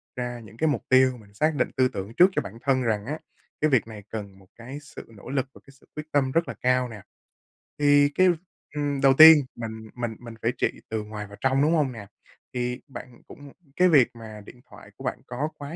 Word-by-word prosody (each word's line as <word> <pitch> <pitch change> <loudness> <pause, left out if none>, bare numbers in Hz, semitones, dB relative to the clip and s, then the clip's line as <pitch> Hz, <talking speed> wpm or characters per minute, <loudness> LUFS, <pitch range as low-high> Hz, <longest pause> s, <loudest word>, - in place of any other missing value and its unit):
ra 125 -1 -4
những 110 -1 -14
cái 160 - +1
mục 145 - -1
tiêu, 130 -1 +4
mình 100 -3 -18
xác 155 +9 +1
định - - 0
tư 130 -1 +4
tưởng 100 -3 -6
trước 180 +2 +7
cho - - 0
bản 105 +4 -9
thân 130 -1 +2
rằng 105 -3 -1
á, 150 +5 -4 0.4
cái 155 - +3
việc 125 -4 +2
này 110 -2 -10
cần 100 -3 -7
một 95 - -20
cái 125 +5 -9
sự 145 - -11
nỗ 100 - -12
lực, 135 -1 0
một - - -15
cái - - -14
sự - - -25
quyết 155 +1 -8
tâm 135 -2 +1
rất 165 +4 +1
là - - -6
cao 125 0 +2
nè. 110 -3 -10 0.8
Thì 145 0 +5
cái, 185 0 +5 0.5
ừm, 145 -2 -2
đầu 135 -1 +6
tiên, 160 0 +11 0.2
mình 110 -1 -7
mình 120 -2 -4
mình 120 -1 -10
phải 115 - +2
trị - - -2
từ 110 -1 -3
ngoài 105 -1 -7
vào 100 0 -13
trong, 135 +1 +2
đúng 155 +3 +3
hông 145 -5 +1
nè? 110 -4 -9 0.5
Thì 125 0 -3
bạn 125 -2 -11
cũng 145 -1 -13 0.2
cái 185 0 +4
việc 145 -7 +5
mà 110 -2 -10
điện 120 - -14
thoại - - -15
của - - -11
bạn - - -3
có 135 +5 -3
quá 145 +3 -7
125 Hz, 240 wpm, -25 LUFS, 110-145 Hz, 0.8 s, tiên